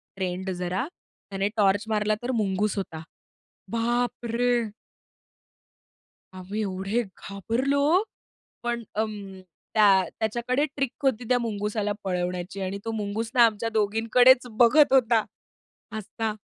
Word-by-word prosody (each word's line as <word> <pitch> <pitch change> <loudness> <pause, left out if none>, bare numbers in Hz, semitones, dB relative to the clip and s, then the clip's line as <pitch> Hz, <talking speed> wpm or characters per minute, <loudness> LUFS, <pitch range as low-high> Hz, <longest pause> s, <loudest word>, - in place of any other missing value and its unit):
Friend 185 0 -3
जरा 180 +4 -2
त्याने 200 - -6
torch 200 0 +3
मारला 215 -1 +1
तर 250 - -1
मुंगूस 205 -1 0
होता. 165 -5 -5 0.7
बापरे! 240 +1 0 1.7
आम्ही 185 +3 -5
एवढे 195 +3 -1
घाबरलो, 260 - 0 0.6
पण 240 0 -2
अं, 205 -3 -4 0.3
त्या 200 -3 +5 0.2
त्याच्याकडे 240 +6 0
ट्रिक 275 -3 -1
होती 255 -3 +1
त्या 250 - +4
मुंगुसाला 210 -2 -2
पळवण्याची 180 0 -3
आणि 190 +1 -3
तो 225 - -2
मुंगुस 220 +1 -3
ना 240 -2 +7
आमच्या 225 0 0
दोघींकडेच 230 +4 +4
बघत 265 +4 +6
होता, 230 -4 +4 0.7
हसता. 220 +1 -3
215 Hz, 110 wpm, -26 LUFS, 195-240 Hz, 1.7 s, ना